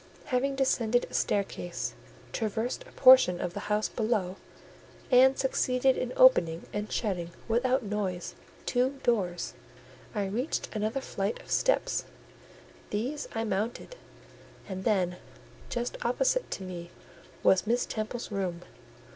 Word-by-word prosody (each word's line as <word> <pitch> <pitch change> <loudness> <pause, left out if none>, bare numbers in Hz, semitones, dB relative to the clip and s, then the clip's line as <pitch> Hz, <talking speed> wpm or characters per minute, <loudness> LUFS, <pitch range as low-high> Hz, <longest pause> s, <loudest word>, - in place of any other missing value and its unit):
Having 275 +1 0
descended 245 -3 +2
a - - -16
staircase, 190 -3 -1 0.4
traversed 225 +2 -2
a - - -15
portion 255 -9 +7
of 180 - -3
the 205 - -4
house 210 +1 +2
below, 210 -5 -1 0.7
and 260 +1 +6
succeeded 260 0 +2
in - - -2
opening 175 - +5
and 210 +1 -3
shutting, 180 -6 -1 0.2
without 250 +3 +2
noise, 200 -4 -3 0.3
two 260 +2 +1
doors, 190 -7 0 0.6
I 205 -1 0
reached 235 +10 -2
another 215 +5 -1
flight 200 -4 -3
of - - -13
steps; - - +1 0.8
these 255 +8 -2
I 225 - 0
mounted, 220 - -3 0.7
and 190 -1 -6
then 180 -4 +1 0.5
just 240 0 -3
opposite - - +1
to 195 - -4
me 175 -2 -7 0.5
was 190 +2 +4
Miss 240 +2 +2
Temple's 220 +2 -4
room. 180 -4 -2
220 Hz, 125 wpm, -29 LUFS, 190-255 Hz, 0.8 s, portion